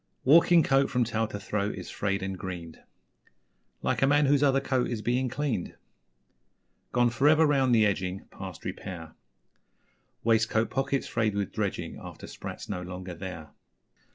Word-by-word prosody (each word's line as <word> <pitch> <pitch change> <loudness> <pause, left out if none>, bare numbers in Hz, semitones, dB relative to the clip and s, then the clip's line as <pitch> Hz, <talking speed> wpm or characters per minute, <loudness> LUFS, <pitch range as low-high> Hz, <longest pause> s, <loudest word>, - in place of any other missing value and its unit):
Walking 165 +4 +6
coat 135 0 +3
from 125 -2 +2
tail 115 -1 -1
to 105 - -6
throat 105 0 -2
is - - -8
Frayed 100 -1 -1
and 95 0 -3
greened 90 -3 -7 1.0
Like - - 0
a 135 - +5
man 145 +1 +4
whose 140 0 +3
other 135 -2 +4
coat 130 -2 0
is 115 -3 -3
Being 125 +2 +1
cleaned; 130 -8 -2 1.2
Gone 120 -1 +3
for 130 +5 +2
ever 155 +1 +5
round 135 -4 +3
the 110 -1 +5
edging 95 -2 -1
Past 95 -3 -9
repair 80 -4 -6 1.1
Waistcoat 110 0 +2
pockets 135 +1 0
frayed 110 -3 0
with 100 -2 -2
dredging - - -3
After - - -9
'sprats' - - -8
no 90 -3 -3
longer 90 0 -7
there. 85 -4 -8
110 Hz, 155 wpm, -28 LUFS, 95-135 Hz, 1.2 s, Walking